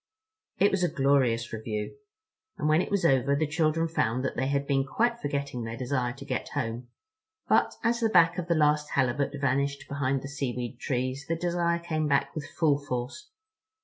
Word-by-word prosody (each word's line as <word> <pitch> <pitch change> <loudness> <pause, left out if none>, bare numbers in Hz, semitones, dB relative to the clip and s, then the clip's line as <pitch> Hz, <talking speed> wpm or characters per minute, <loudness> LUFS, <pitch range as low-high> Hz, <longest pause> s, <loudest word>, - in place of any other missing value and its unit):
It 200 - +4
was 195 -2 0
a 175 - +3
glorious 135 -6 +2
review, 110 -1 -4 0.6
and - - -1
when 155 +2 +4
it - - -4
was 200 -4 0
over 135 -1 +3
the 155 +2 +1
children 155 +2 +1
found 130 -5 0
that - - -2
they 130 - 0
had 140 0 0
been 135 -1 +2
quite 235 - 0
forgetting 140 - -3
their 115 0 -5
desire 125 -1 -1
to 140 +2 -10
get 130 -4 -3
home. 115 +2 -3 0.6
But - - +3
as 235 0 +2
the 225 -2 +2
back 175 -2 +4
of 175 - -4
the 170 - +2
last 150 -1 +2
Halibut 140 +2 +1
vanished 140 +1 0
behind 140 -1 -1
the - - -5
seaweed 125 -3 -4
trees 130 +2 -2
the 165 - 0
desire 170 0 0
came 155 -2 -2
back 140 -1 +1
with 155 - -5
full 150 -4 +2
force. 140 - -5
140 Hz, 190 wpm, -28 LUFS, 130-160 Hz, 0.6 s, It